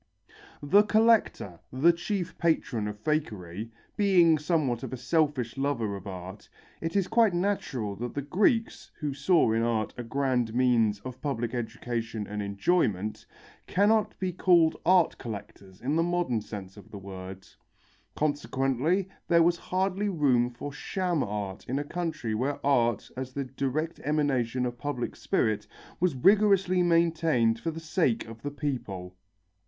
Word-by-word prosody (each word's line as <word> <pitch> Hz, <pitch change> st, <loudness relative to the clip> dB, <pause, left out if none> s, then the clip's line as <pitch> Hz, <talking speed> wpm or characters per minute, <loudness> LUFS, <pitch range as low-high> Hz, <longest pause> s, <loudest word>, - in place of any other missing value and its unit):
The 175 Hz, +9 st, +6 dB
collector, 215 Hz, -, +2 dB
the 150 Hz, +7 st, +4 dB
chief 185 Hz, +1 st, -3 dB
patron 140 Hz, -10 st, 0 dB
of 105 Hz, 0 st, -5 dB
fakery, 110 Hz, -, -2 dB, 0.3 s
being 175 Hz, -6 st, +4 dB
somewhat 150 Hz, -7 st, 0 dB
of 130 Hz, -, -6 dB
a -, -, -3 dB
selfish 135 Hz, -3 st, 0 dB
lover 120 Hz, -7 st, -1 dB
of 100 Hz, 0 st, -9 dB
art, 95 Hz, +2 st, -8 dB, 0.3 s
it 165 Hz, +2 st, -3 dB
is 195 Hz, -2 st, +2 dB
quite 225 Hz, -4 st, +3 dB
natural 140 Hz, -, -1 dB
that 120 Hz, +1 st, -5 dB
the 140 Hz, -, -2 dB
Greeks, 210 Hz, -, +1 dB
who 150 Hz, -2 st, -2 dB
saw 140 Hz, -1 st, +3 dB
in 115 Hz, +1 st, +1 dB
art 115 Hz, -2 st, 0 dB
a -, -, -3 dB
grand 125 Hz, -2 st, 0 dB
means 115 Hz, -5 st, +2 dB
of 130 Hz, +3 st, -8 dB
public 120 Hz, -5 st, -2 dB
education 115 Hz, -2 st, -3 dB
and 105 Hz, +1 st, -4 dB
enjoyment, 105 Hz, -, 0 dB, 0.4 s
cannot 210 Hz, +3 st, +2 dB
be 185 Hz, -2 st, -2 dB
called 170 Hz, -3 st, +4 dB
art 180 Hz, -2 st, +4 dB
collectors 100 Hz, -4 st, -9 dB
in 140 Hz, +5 st, -1 dB
the 165 Hz, -, +3 dB
modern 175 Hz, -9 st, 0 dB
sense 100 Hz, -2 st, -8 dB
of 105 Hz, -, -14 dB
the 105 Hz, -, -9 dB
word. 95 Hz, -1 st, -9 dB, 0.7 s
Consequently 145 Hz, +4 st, 0 dB, 0.2 s
there 170 Hz, -1 st, +5 dB
was 170 Hz, +1 st, +3 dB
hardly 190 Hz, +3 st, -1 dB
room 135 Hz, -9 st, +2 dB
for 130 Hz, +4 st, -7 dB
sham 175 Hz, +1 st, -1 dB
art 100 Hz, -2 st, -4 dB
in 130 Hz, -, 0 dB
a 145 Hz, -, -1 dB
country 155 Hz, -8 st, -3 dB
where 130 Hz, +6 st, -1 dB
art 120 Hz, -6 st, +2 dB
as 130 Hz, 0 st, -5 dB
the 140 Hz, -, -2 dB
direct 140 Hz, +5 st, -3 dB
emanation 130 Hz, -5 st, 0 dB
of 120 Hz, -1 st, -4 dB
public 145 Hz, -4 st, -3 dB
spirit 105 Hz, -1 st, 0 dB, 0.3 s
was 175 Hz, -5 st, +1 dB
rigorously 195 Hz, +3 st, +4 dB
maintained 165 Hz, -9 st, +2 dB
for 165 Hz, -, -3 dB
the 165 Hz, 0 st, -5 dB
sake 160 Hz, -6 st, 0 dB
of 115 Hz, 0 st, -10 dB
the 145 Hz, -, -3 dB
people. 120 Hz, -11 st, -4 dB
135 Hz, 150 wpm, -28 LUFS, 115-170 Hz, 0.7 s, The